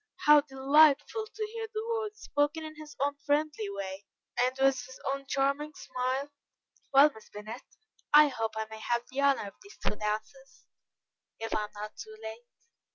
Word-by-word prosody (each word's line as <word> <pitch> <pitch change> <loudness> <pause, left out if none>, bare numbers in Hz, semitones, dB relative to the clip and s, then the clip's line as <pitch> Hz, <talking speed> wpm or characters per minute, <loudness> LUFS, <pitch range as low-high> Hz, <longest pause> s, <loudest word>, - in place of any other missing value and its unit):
How 295 0 +8
delightful 290 +8 +4
to 435 - -3
hear 450 -1 -4
the 435 0 -3
words, 435 -2 -3
spoken 290 +2 0
in 310 0 -8
his 305 -1 -11
own 285 - 0
friendly 290 -7 0
way, 195 0 -6 0.3
and 255 +1 +2
with 270 -1 +3
his 260 +1 -12
own 275 0 -6
charming 280 +3 0
smile: 260 +3 -2 0.6
"Well, 280 +2 +7
Miss 220 - -15
Bennet, 215 +4 -8 0.5
I 300 0 +8
hope 225 -4 -3
I 220 - -1
may 220 0 -10
have 235 +2 0
the 270 +2 -1
honour 280 -7 +3
of - - -21
these 400 +1 -15
two - - -2
dances, 215 +6 -5 0.7
if 225 0 -4
I 210 - 0
am - - -13
not 210 +1 -7
too 220 - -9
late?" 220 +2 -8
270 Hz, 175 wpm, -30 LUFS, 220-300 Hz, 0.7 s, How